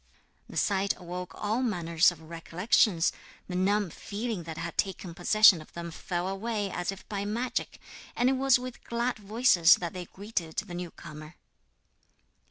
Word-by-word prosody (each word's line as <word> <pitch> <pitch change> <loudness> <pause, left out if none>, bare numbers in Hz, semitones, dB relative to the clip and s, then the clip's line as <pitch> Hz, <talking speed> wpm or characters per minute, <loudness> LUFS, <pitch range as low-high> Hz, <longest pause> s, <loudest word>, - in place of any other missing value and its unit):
The - - -7
sight 200 0 +1
awoke 180 0 -7
all 215 +4 -1
manner 175 -9 -2 0.2
of 175 -3 -8
recollections; 170 +3 +2 0.4
the 180 - -5
numb 195 0 +1
feeling 215 +1 -4
that 160 -1 -7
had 170 0 -5
taken 190 -3 -2
possession 185 0 +6
of 155 - -16
them 170 0 -6
fell 175 +2 -3
away 205 +1 -2
as 180 +2 -2
if 195 - -11
by 200 -2 -3
magic, 230 +5 -3 0.4
and 245 - +2
it 265 - +4
was 265 -1 +4
with 250 0 -8
glad 235 0 -2
voices 205 -4 +5
that 175 -2 -5
they 180 -1 -6
greeted 185 -4 -5
the 205 -4 -3
new 175 0 -4
comer. 155 0 -11
190 Hz, 165 wpm, -29 LUFS, 175-215 Hz, 0.4 s, possession